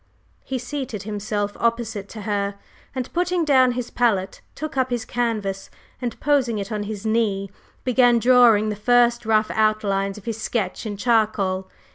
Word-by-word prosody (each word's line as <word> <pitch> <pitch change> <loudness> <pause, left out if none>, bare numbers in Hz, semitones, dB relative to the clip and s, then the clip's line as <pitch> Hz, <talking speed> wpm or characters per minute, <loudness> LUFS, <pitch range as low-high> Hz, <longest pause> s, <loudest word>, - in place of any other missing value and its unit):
He 265 - -3
seated 245 -4 -5
himself 205 0 -3
opposite 230 -4 -1
to 220 - -8
her, 200 -1 -1 0.4
and, 255 -1 -4
putting 355 -1 +1
down 260 -4 +4
his 245 -1 -4
palette, 205 -6 0
took 310 -1 -5
up 260 -1 +1
his 240 -2 -2
canvas, 215 -5 -2 0.3
and 240 -2 -4
posing 270 -6 +2
it 200 +1 -5
on 210 -1 -2
his 215 -1 -6
knee, 210 -3 0 0.3
began 245 -1 +4
drawing 235 -3 +5
the 210 - -2
first 240 +2 +3
rough 215 -1 +2
outline 205 -2 +1
of 210 - -12
his 225 -1 -4
sketch 215 -2 -2
in 205 -1 -5
charcoal. 205 -4 +1
225 Hz, 160 wpm, -23 LUFS, 205-245 Hz, 0.4 s, drawing